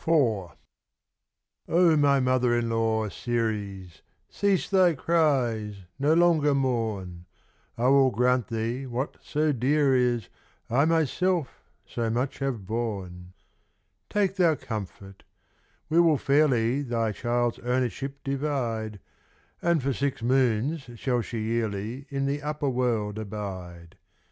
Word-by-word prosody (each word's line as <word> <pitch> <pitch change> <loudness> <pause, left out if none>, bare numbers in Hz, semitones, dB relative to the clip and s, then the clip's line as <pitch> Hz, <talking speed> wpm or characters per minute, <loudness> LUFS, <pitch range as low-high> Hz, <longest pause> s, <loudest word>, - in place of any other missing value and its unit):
Oh, 110 - +1 1.1
my 155 -5 +4
mother 125 -2 +2
in 115 -1 -1
law, 110 -1 +1
Ceres, 100 -6 -3 0.3
Cease 200 -2 +1
thy 185 -4 +4
cries, 130 -10 +1 0.2
no 150 +3 +3
longer 160 -4 +4
mourn. 110 -10 -2 0.5
I 120 - -1
will 135 -1 +5
grant 125 +1 +1
thee, 115 +3 -3
what 125 +3 -3
so 155 0 0
dear 140 +2 +2
is, 120 -2 +1 0.4
I 135 +5 +4
myself 165 0 +1 0.4
so 115 -1 -3
much 125 +4 -2
have 130 -8 -3
borne. 95 -5 -4 0.8
Take 200 -2 0
thou 170 -4 +4
comfort. 100 -5 -7 0.7
We 160 +3 +3
will 165 -3 +5
fairly 135 -3 +2
Thy 115 -4 -1
child's 120 +2 -1
ownership 130 +3 -2
divide; 125 -7 -2 0.6
And 170 -5 +1
for 135 0 0
six 135 -2 -2
moons 130 +3 +1
shall 125 +1 0
she 115 0 -5
yearly 110 +3 -3
In 140 -1 -2
the 140 +1 -1
upper 150 -1 -2
world 115 -4 -1
abide. 95 -4 -7
125 Hz, 120 wpm, -26 LUFS, 110-145 Hz, 1.1 s, will